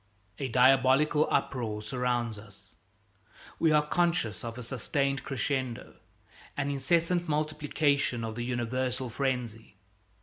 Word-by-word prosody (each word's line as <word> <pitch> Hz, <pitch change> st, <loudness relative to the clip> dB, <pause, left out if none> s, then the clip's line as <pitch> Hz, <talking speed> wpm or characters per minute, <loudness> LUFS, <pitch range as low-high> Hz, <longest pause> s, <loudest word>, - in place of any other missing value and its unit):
A 135 Hz, -, -1 dB
diabolical 130 Hz, +4 st, +4 dB
uproar 115 Hz, -6 st, -1 dB
surrounds 120 Hz, -1 st, -1 dB
us. 100 Hz, -2 st, -16 dB, 0.9 s
We 160 Hz, -, +4 dB
are 150 Hz, -1 st, +4 dB
conscious 170 Hz, -, 0 dB
of 115 Hz, 0 st, -6 dB
a 125 Hz, -, -6 dB
sustained 140 Hz, +2 st, -1 dB
crescendo, 130 Hz, -3 st, -3 dB, 0.6 s
an 145 Hz, 0 st, 0 dB
incessant 170 Hz, +4 st, +1 dB
multiplication 150 Hz, -4 st, 0 dB
of 110 Hz, -1 st, -3 dB
the 120 Hz, +1 st, -4 dB
universal 125 Hz, +1 st, -2 dB
frenzy. 120 Hz, -5 st, -3 dB
130 Hz, 110 wpm, -29 LUFS, 120-145 Hz, 0.9 s, diabolical